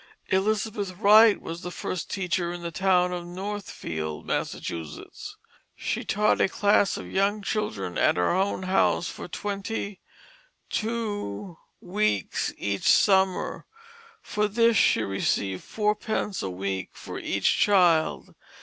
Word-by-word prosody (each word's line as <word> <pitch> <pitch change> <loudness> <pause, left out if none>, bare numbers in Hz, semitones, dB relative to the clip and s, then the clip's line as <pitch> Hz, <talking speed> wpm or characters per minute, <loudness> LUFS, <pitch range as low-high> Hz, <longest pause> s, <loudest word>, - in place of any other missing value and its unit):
Elizabeth 205 0 0
Wright 210 +3 +6
was 165 +1 -7
the 180 - -5
first 180 -1 -5
teacher 180 -2 -1
in 175 0 -7
the 170 - -4
town 180 0 +2
of 175 -1 -4
Northfield, 175 - -5
Massachusetts. 80 -3 -5 0.4
She - - -3
taught 210 +1 +2
a - - +3
class 205 0 +2
of - - -7
young 200 +2 0
children 105 - -2
at - - +3
her 90 - +2
own 190 +1 0
house 185 -1 +2
for - - -7
twenty 200 +1 -4 0.7
two 205 - -3 0.2
weeks 185 - -1
each 100 -1 -1
summer; 190 -2 +2 0.6
for 210 0 0
this 230 +2 +3
she 115 - +4
received 95 -1 -1
fourpence 210 -1 -1
a 95 - -3
week 95 0 -3
for - - -8
each - - +1
child. 175 -6 +3
190 Hz, 125 wpm, -26 LUFS, 165-210 Hz, 0.7 s, Wright